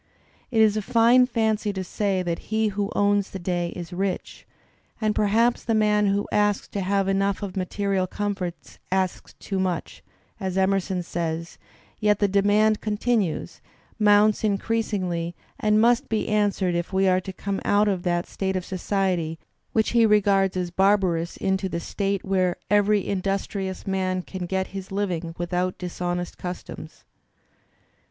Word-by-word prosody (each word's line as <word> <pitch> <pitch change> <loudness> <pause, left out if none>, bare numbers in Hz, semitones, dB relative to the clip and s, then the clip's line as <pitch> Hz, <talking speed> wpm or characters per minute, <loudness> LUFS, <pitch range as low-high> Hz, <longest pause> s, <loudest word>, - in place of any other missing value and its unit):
It 225 -4 +2
is 215 -1 +4
a 215 - 0
fine 240 +3 +5
fancy 220 -3 0
to 190 -1 -3
say 190 0 -1
that 170 -1 -2
he 220 0 +1
who 200 0 -2
owns 205 -1 +2
the - - -6
day 175 -1 -1
is 175 0 -7
rich, 190 0 -3 0.5
and 215 -1 +1
perhaps 225 +4 +2
the 225 - 0
man 210 -1 +3
who 200 +1 0
asks 205 -1 +1
to 200 - -3
have 195 +1 +1
enough 195 +1 0
of 195 -2 -5
material 190 0 -1
comforts 195 -3 -4
asks 190 -1 -1
too 195 -2 -4
much, 185 -2 -2 0.4
as 190 -2 -3
Emerson 190 -1 +1
says, 165 0 -4 0.4
yet 210 -1 +3
the 205 - +2
demand 205 +2 +3
continues, 215 -4 -1 0.4
moimts 210 0 +5
increas 220 +2 0
ingly, 175 -4 -2 0.2
and 210 0 +3
must 240 +4 +3
be 220 -1 -1
answered 205 -4 +1
if 170 +2 -2
we 190 0 +2
are 185 0 +3
to 190 - -6
come 195 +1 -4
out 205 +1 +3
of 190 -3 0
that 175 -1 0
state 190 -1 -3
of 185 -1 -2
society 185 -4 -1 0.3
which 220 -1 +1
he 230 -1 +5
regards 195 -3 +3
as 180 -1 -2
barbarous 185 -3 +2
into 190 0 0
the 170 - -3
state 200 +2 -2
where 185 -2 +1 0.2
"every 205 -1 +3
industrious 195 0 -2
man 185 -1 -1
can 185 -1 -6
get 190 +1 -1
his 195 -1 -7
living 175 -4 -2
without 180 +1 -1
dishonest 175 0 -4
customs." 180 0 -7
195 Hz, 160 wpm, -24 LUFS, 185-210 Hz, 0.5 s, fine